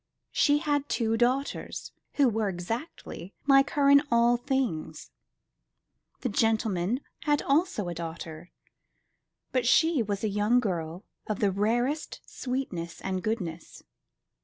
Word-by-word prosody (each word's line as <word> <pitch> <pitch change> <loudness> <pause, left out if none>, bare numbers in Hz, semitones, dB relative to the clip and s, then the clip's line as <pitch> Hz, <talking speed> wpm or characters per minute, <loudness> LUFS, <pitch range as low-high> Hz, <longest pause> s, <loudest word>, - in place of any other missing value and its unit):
She 290 0 +4
had 290 -2 -1
two 225 -2 +1
daughters, 255 +4 -1 0.2
who 280 -2 +4
were 220 -3 0
exactly 190 - -6
like 275 0 +5
her 280 -1 +4
in 280 0 +8
all 235 +1 +4
things. 240 - -2 1.1
The - - -1
gentleman 220 0 +1 0.2
had 295 -1 +2
also 280 - +1
a 175 - -3
daughter, 165 0 -7 1.0
but 255 -2 +1
she 320 +1 +4
was 205 -2 -3
a - - +2
young 210 +4 +2
girl 175 -4 -3 0.2
of 215 - -1
the 200 -2 +2
rarest 240 +9 0
sweetness 180 -11 -4
and 190 -1 -2
goodness. 180 -7 -4
225 Hz, 125 wpm, -28 LUFS, 185-270 Hz, 1.1 s, in